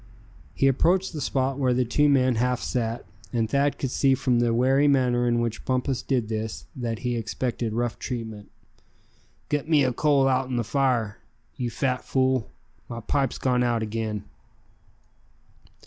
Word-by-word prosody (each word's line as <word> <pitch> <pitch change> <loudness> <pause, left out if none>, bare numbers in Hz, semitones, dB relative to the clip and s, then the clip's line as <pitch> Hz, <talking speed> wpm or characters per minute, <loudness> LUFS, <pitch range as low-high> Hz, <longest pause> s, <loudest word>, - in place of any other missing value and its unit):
He 135 - +3
approached 175 +8 +2
the 150 - -4
spot 135 0 -1
where 130 -2 +2
the 125 0 +2
two 145 +5 +3
men 130 -3 +3
half 125 +1 +1
sat; 115 -1 -2 0.3
and 115 -2 0
Thad 140 +4 +1
could 135 - -3
see 135 0 +3
from 125 -2 +1
the 120 -1 +2
wary 130 +5 +3
manner 125 -3 +2
in 120 0 +2
which 115 -2 -3
Bumpus 130 0 -1
did 125 -5 -1
this 110 0 -4
that 115 -3 -3
he 120 -1 0
expected 115 +1 -2
rough 120 0 -2
treatment. 110 -4 -6 1.0
"Git 150 +1 -1
me 150 -3 +5
a 130 -1 +1
coal 140 0 +3
outen 130 -1 0
the 120 - 0
fire, 120 -4 0 0.4
you 120 -2 -2
fat 125 +2 -1
fool; 130 -3 +1 0.4
my 115 - -5
pipe's 135 +3 -1
gone 125 -1 +1
out 120 -2 +1
again!" 110 -1 -3
125 Hz, 165 wpm, -25 LUFS, 115-135 Hz, 1.0 s, me